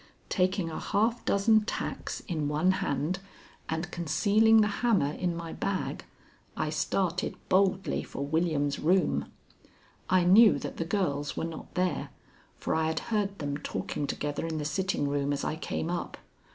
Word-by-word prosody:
Taking 185 -2 +1
a - - -4
half 225 +3 0
dozen 215 +2 +4
tacks 215 - -4
in 155 -5 -2
one 155 +5 +2
hand 150 +7 -1 0.5
and 160 +2 -2
concealing 210 +7 +4
the 210 - +3
hammer 205 -12 +3
in 175 +2 -2
my 165 -1 -6
bag, 195 -1 -3 0.5
I - - -1
started 180 -2 -1
boldly 190 0 +2
for 140 - -5
William's 145 -2 0
room. 160 - +1 0.8
I 185 -1 +4
knew 205 +5 +7
that - - -6
the 165 - -2
girls 145 -7 -1
were - - -1
not 165 -1 -8
there, 180 0 0 0.5
for - - -2
I 160 0 +1
had 160 - 0
heard 200 -2 0
them 145 -1 -3
talking 145 -1 -3
together 145 +3 -3
in 160 -1 -3
the 150 - -3
sitting 185 -2 0
room 140 0 0
as 145 - -1
I - - -1
came 160 +1 -3
up. 175 - -4
170 Hz, 160 wpm, -29 LUFS, 150-195 Hz, 0.8 s, knew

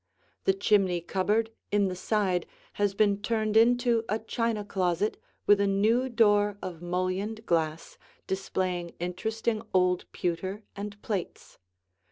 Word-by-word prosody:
The 195 - +4
chimney 195 -3 +2
cupboard 205 +6 0 0.2
in 205 -1 +3
the 185 - -3
side 185 -2 0 0.3
has 200 -1 +2
been 205 -1 +2
turned 215 0 0
into 240 0 +4
a 215 - +1
china 225 -1 -2
closet 190 +1 0 0.3
with 205 -1 +6
a 200 - +3
new 220 +6 +2
door 205 -3 +3
of 175 -4 -7
mullioned 185 +5 -2
glass 160 -1 -1 0.3
displaying 185 -2 -2
interesting 220 +5 -2
old 180 -1 +2
pewter 185 +4 -3
and 205 0 -6
plates. 200 -5 -5
200 Hz, 130 wpm, -28 LUFS, 185-220 Hz, 0.3 s, with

